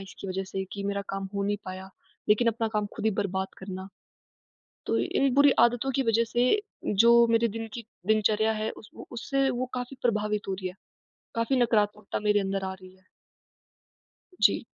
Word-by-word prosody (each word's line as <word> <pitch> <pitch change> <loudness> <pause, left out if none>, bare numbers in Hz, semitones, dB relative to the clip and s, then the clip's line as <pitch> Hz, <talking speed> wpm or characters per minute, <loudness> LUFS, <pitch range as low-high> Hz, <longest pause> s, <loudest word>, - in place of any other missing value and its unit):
इसकी 195 0 -9
वजह 190 +1 -2
से 190 0 -2
कि 200 - -5
मेरा 200 0 -1
काम 195 0 -4
हो 200 - 0
नहीं 205 +1 0
पाया, 185 +1 -7 0.4
लेकिन 225 +3 +4
अपना 225 0 0
काम 210 -1 +1
ख़ुद 220 - -2
ही - - +4
बर्बाद 190 -1 -2
करना। 190 0 -7 1.0
तो - - +1
इन 275 -1 +1
बुरी 285 +1 +7
आदतों 245 +3 +3
की 270 - +2
वजह 230 +2 +3
से 245 +1 +3 0.4
जो 235 +3 +6
मेरे 230 0 +3
दिन 225 +1 -5
की 235 - -6 0.2
दिनचर्या 215 0 +3
है, 215 0 -2
उस 215 - -12
वो - - -10
उससे 270 +3 0
वो 250 0 -2
काफ़ी 250 +2 -5
प्रभावित 210 -3 0
हो 190 - 0
रही 185 -1 -4
है। 180 - -9 0.6
काफ़ी 230 +3 +1
नकारात्मकता 210 -3 +1
मेरे 210 0 +3
अंदर 195 0 -2
आ 190 - -3
रही 185 0 -15
है। 185 - -29 1.4
जी। - - +4
210 Hz, 185 wpm, -27 LUFS, 195-235 Hz, 1.4 s, बुरी